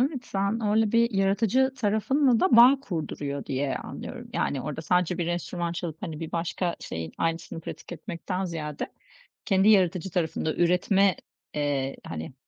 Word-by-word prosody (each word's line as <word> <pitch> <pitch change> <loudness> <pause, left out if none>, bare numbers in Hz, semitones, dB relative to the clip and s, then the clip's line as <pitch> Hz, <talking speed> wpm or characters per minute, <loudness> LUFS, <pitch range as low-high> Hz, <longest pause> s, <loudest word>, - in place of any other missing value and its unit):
Evet, 265 -1 0
sen 200 +3 -1
öyle 215 0 +2
bir 235 0 +4
yaratıcı 205 +6 +2
tarafınla 245 +3 +2
da 275 -11 +4
bağ 255 +4 +8
kurduruyor 145 - -4
diye 135 0 -1
anlıyorum. - - -7
Yani, 140 - -1
orada 150 +4 -5
sadece 180 +2 +1
bir 175 - -1
enstrüman 175 0 -2
çalıp, 165 -2 -5
hani, 155 -1 -5
bir 165 - -6
başka 170 +1 -1
şeyin 80 0 -5
aynısını 165 0 -2
pratik 165 - -8
etmekten 175 +3 -4
ziyade, 155 -4 -5 0.5
kendi 195 +1 +3
yaratıcı 190 -3 +3
tarafında 160 -3 -1
üretme, 180 +2 +3 0.4
eee, 140 -2 -1
hani, 80 +4 -6
180 Hz, 150 wpm, -27 LUFS, 160-210 Hz, 0.5 s, bağ